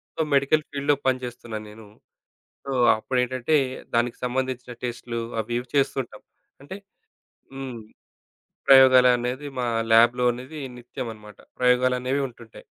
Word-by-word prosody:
So, - - -1
medical 140 +3 +3
ఫీల్డ్‌లో 140 0 +1
పనిజేస్తున్నాను 120 -4 -3
నేను. 110 -1 -14 0.8
So, 140 - -6 0.3
అప్పుడేటంటే 130 +4 0 0.4
దానికి 120 0 +1
సంబంధించిన 125 -1 -3
టెస్ట్‌‌‌లు 120 -1 -4 0.2
అవి 120 +2 -4
ఇవి 125 0 -7
చేస్తుంటాం. 135 -5 -1 0.4
అంటే 190 +7 -8 0.8
హ్మ్. 135 -3 -6 0.9
ప్రయోగాలనేవి 130 0 +5
మా 120 - -1 0.3
లాబ్‌లో 120 +2 +5
అనేది 130 +6 -9 0.2
నిత్యం 120 0 -7
అనమాట. 105 -2 -14 0.2
ప్రయోగాలనేవి 125 +2 +2
ఉంటుంటాయి. 115 -2 -15
125 Hz, 110 wpm, -24 LUFS, 120-135 Hz, 0.9 s, ప్రయోగాలనేవి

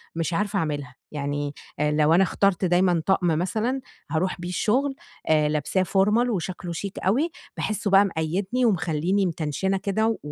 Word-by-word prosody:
مش 165 0 -1
عارفة 205 +2 0
أعملها، 145 -5 -3 0.2
يعني 145 0 -3 0.3
آآ 150 0 +2
لو 150 +1 +3
أنا 190 +3 +6
اخترت 195 -1 +1
دايمًا 175 -1 +3
طقم 190 -2 +2
مثلًا 215 +11 0 0.3
هاروح 180 +3 0
بيه 175 - -4
الشغل، 265 +10 +1 0.3
آآ 150 -1 +4
لابساه 155 +5 0
formal 195 +3 +2 0.2
وشكله 180 -3 -3
شيك 195 +4 -5
أوي، 260 - +1 0.3
باحسّه 205 -2 -2
بقى 195 +1 +7
مقيّدني 190 +8 -1
ومخليني 180 0 +1
متنشنة 175 +3 -1
كده، 220 +3 0
185 Hz, 150 wpm, -25 LUFS, 160-200 Hz, 0.3 s, بقى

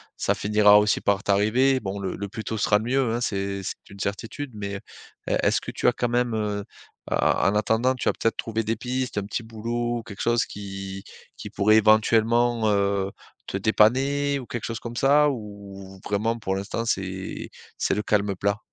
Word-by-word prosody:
ça - - +1
finira 105 0 +5
aussi 105 0 +1
par 100 0 +1
t'arriver. 120 +7 +3
Bon, 100 0 -4
le 95 -2 -3
le 100 0 -5
plus 110 +1 -7
tôt 110 - -3
sera 105 0 +3
le 110 - -5
mieux, 130 -1 +1
hein, - - -1
c'est 100 -3 -2
c'est - - -4
une 100 - -13
certitude, 115 +8 -4
mais, 100 -1 -4 0.5
est - - +2
est-ce - - +3
que - - -7
tu - - -5
as - - +2
quand 120 - -1
même, 120 0 +1
heu 105 -2 -1
heu, - - -8 0.5
en - - +2 0.4
en - - -2
attendant, 110 +5 +2
tu 125 - -4
as - - +4
peut-être 115 - -1
trouvé 115 0 -2
des 110 +1 -1
pistes, 125 -2 -3
un 105 - 0
petit 110 +3 -4
boulot, 115 +1 -3
quelque 105 -3 -9
chose, 120 0 +2
qui 95 -1 -7 0.3
qui - - -8
pourrait 110 +2 +3
éventuellement, 110 +1 +4
heu, 100 -1 +1 0.3
te - - -3
dépanner, 135 +7 +2
ou 130 - -8
quelque 120 0 -5
chose 115 -1 -4
comme 120 0 -7
ça? 145 +4 +4
Ou 100 -5 -8
vraiment, 110 +3 0
pour 95 -3 -2
l'instant, 100 +4 -3
c'est 95 -3 -3 0.3
c'est - - +1
le 105 - -1
calme 105 -2 +1
plat? 100 +2 0
110 Hz, 200 wpm, -25 LUFS, 100-120 Hz, 0.5 s, finira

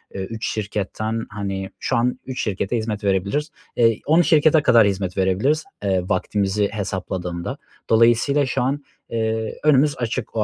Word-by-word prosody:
eee, 95 - -3
3 110 +4 -4
şirketten, 110 +2 -3
hani, 95 -2 -4
şu 130 - -1
an 125 +2 0
3 130 -1 -4
şirkete 100 +2 -1
hizmet 110 -2 -3
verebiliriz. 100 +10 0 0.3
Eee, 115 -2 +3
10 160 +4 +5
şirkete 155 -1 +4
kadar 115 -7 +6
hizmet 95 -2 -2
verebiliriz, 100 +12 +1 0.2
eee, 95 -2 +1
vaktimizi 100 +1 0
hesapladığımda. 95 -4 -4 0.3
Dolayısıyla 120 +5 +4
şu 130 0 -1
an, 140 +3 -1 0.3
eee, 110 -1 -2
önümüz 150 -1 +4
açık 120 -1 -3
o 110 - +2
110 Hz, 150 wpm, -22 LUFS, 100-130 Hz, 0.3 s, kadar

